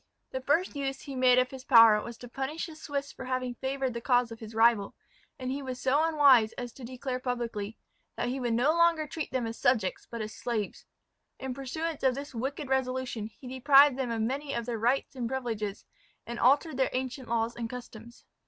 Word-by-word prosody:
The 260 Hz, -, -3 dB
first 305 Hz, +6 st, +1 dB
use 270 Hz, -1 st, -3 dB
he 275 Hz, -2 st, -7 dB
made 255 Hz, -1 st, +5 dB
of 255 Hz, 0 st, +3 dB
his 265 Hz, -1 st, -9 dB
power 230 Hz, -5 st, +7 dB
was 235 Hz, +1 st, -8 dB
to 245 Hz, -, -10 dB
punish 270 Hz, +6 st, -4 dB
the 320 Hz, -, -10 dB
Swiss 285 Hz, -2 st, -4 dB
for 260 Hz, -, -9 dB
having 255 Hz, -1 st, -2 dB
favoured 265 Hz, 0 st, -2 dB
the 235 Hz, -, -5 dB
cause 245 Hz, -1 st, +2 dB
of 225 Hz, -, -8 dB
his 220 Hz, 0 st, -9 dB
rival; 225 Hz, -3 st, +3 dB, 0.4 s
and 255 Hz, -1 st, -4 dB
he 280 Hz, +2 st, -3 dB
was 255 Hz, -2 st, -5 dB
so 280 Hz, +4 st, +2 dB
unwise 280 Hz, -9 st, +5 dB
as 245 Hz, -1 st, -6 dB
to 265 Hz, -, -12 dB
declare 255 Hz, +1 st, -4 dB
publicly, 235 Hz, -4 st, -3 dB, 0.4 s
"that -, -, -2 dB
he 265 Hz, +2 st, -2 dB
would 240 Hz, -2 st, 0 dB
no 250 Hz, +6 st, +3 dB
longer 335 Hz, -1 st, +3 dB
treat 305 Hz, +1 st, -5 dB
them 255 Hz, -2 st, -1 dB
as 225 Hz, 0 st, -5 dB
subjects, 215 Hz, -7 st, +1 dB
but 235 Hz, -, -6 dB
as 215 Hz, 0 st, -5 dB
slaves." 220 Hz, -4 st, -4 dB, 0.5 s
In 265 Hz, -1 st, -4 dB
pursuance 295 Hz, +4 st, -4 dB
of 260 Hz, -2 st, +3 dB
this 280 Hz, +1 st, -7 dB
wicked 270 Hz, +5 st, -3 dB
resolution 255 Hz, -4 st, -1 dB
he 250 Hz, +3 st, -14 dB
deprived 270 Hz, +2 st, +6 dB
them 260 Hz, -2 st, -2 dB
of 225 Hz, -1 st, -1 dB
many 275 Hz, +4 st, -2 dB
of 235 Hz, -1 st, -2 dB
their 235 Hz, -2 st, -3 dB
rights 250 Hz, +5 st, +1 dB
and 240 Hz, -3 st, -3 dB
privileges, 225 Hz, -6 st, -3 dB, 0.4 s
and 235 Hz, +1 st, -6 dB
altered 280 Hz, +3 st, +3 dB
their 265 Hz, -, +2 dB
ancient 260 Hz, 0 st, -4 dB
laws 230 Hz, 0 st, 0 dB
and 230 Hz, -1 st, -4 dB
customs. 235 Hz, -1 st, -10 dB
255 Hz, 210 wpm, -29 LUFS, 235-275 Hz, 0.5 s, power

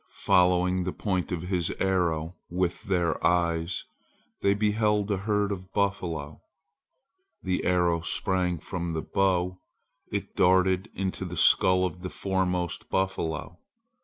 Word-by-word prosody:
Following 90 Hz, 0 st, +3 dB
the 90 Hz, -, -3 dB
point 95 Hz, -5 st, -2 dB
of 85 Hz, -2 st, -2 dB
his 90 Hz, -2 st, 0 dB
arrow 85 Hz, -3 st, 0 dB
with 90 Hz, 0 st, -2 dB
their 90 Hz, -3 st, 0 dB
eyes, 85 Hz, 0 st, +1 dB, 0.6 s
they 100 Hz, 0 st, +3 dB
beheld 105 Hz, 0 st, +1 dB
a 100 Hz, -, +1 dB
herd 105 Hz, +1 st, 0 dB
of 95 Hz, -1 st, -6 dB
buffalo. 85 Hz, -7 st, -2 dB, 1.0 s
The 95 Hz, -1 st, -1 dB
arrow 90 Hz, -2 st, +2 dB
sprang 90 Hz, +1 st, 0 dB
from 85 Hz, +1 st, -4 dB
the 80 Hz, -, -2 dB
bow! 90 Hz, -2 st, 0 dB, 0.5 s
It -, -, -4 dB
darted 95 Hz, +2 st, +3 dB
into 95 Hz, 0 st, -3 dB
the 90 Hz, -2 st, -6 dB
skull 90 Hz, +3 st, +5 dB
of 90 Hz, 0 st, -5 dB
the 90 Hz, -, -4 dB
foremost 90 Hz, -3 st, -2 dB
buffalo. 85 Hz, -3 st, -2 dB
90 Hz, 130 wpm, -27 LUFS, 85-95 Hz, 1.0 s, skull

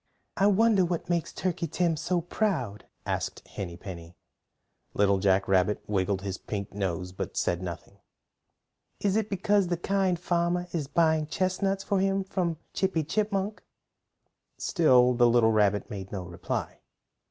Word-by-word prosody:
"I 195 Hz, -, +3 dB
wonder 205 Hz, -1 st, +4 dB
what 175 Hz, 0 st, -2 dB
makes 170 Hz, -2 st, 0 dB
Turkey 175 Hz, -2 st, -2 dB
Tim 170 Hz, +1 st, +1 dB
so 170 Hz, +3 st, 0 dB
proud?" 160 Hz, -, -2 dB, 0.2 s
asked -, -, -3 dB
Henny 85 Hz, -4 st, -6 dB
Penny. 85 Hz, -2 st, -9 dB, 0.8 s
Little 100 Hz, -1 st, +3 dB
Jack 95 Hz, 0 st, +2 dB
Rabbit 95 Hz, +2 st, +2 dB
wiggled 95 Hz, -1 st, 0 dB
his 95 Hz, -2 st, -4 dB
pink 100 Hz, -2 st, -5 dB
nose, 90 Hz, -2 st, -2 dB
but 95 Hz, -, -6 dB
said 85 Hz, 0 st, 0 dB
nothing. 85 Hz, -2 st, -7 dB, 1.0 s
"Is 200 Hz, -1 st, +1 dB
it 220 Hz, -1 st, 0 dB
because 200 Hz, 0 st, +2 dB
the 175 Hz, 0 st, -1 dB
Kind 190 Hz, -1 st, 0 dB
Farmer 175 Hz, 0 st, 0 dB
is 155 Hz, -5 st, -2 dB
buying 160 Hz, 0 st, +2 dB
chestnuts 190 Hz, +3 st, 0 dB
for 200 Hz, -, +1 dB
him 195 Hz, 0 st, +1 dB
from 180 Hz, -4 st, -2 dB, 0.2 s
Chippy 190 Hz, -4 st, 0 dB
Chipmunk?" 205 Hz, +4 st, -1 dB, 1.0 s
Still 125 Hz, -8 st, +4 dB
the 120 Hz, 0 st, +4 dB
little 115 Hz, -1 st, +4 dB
rabbit 105 Hz, -2 st, +2 dB
made 95 Hz, -2 st, -6 dB
no 95 Hz, -3 st, -4 dB
reply. 85 Hz, 0 st, -4 dB
160 Hz, 145 wpm, -28 LUFS, -, 1.0 s, wonder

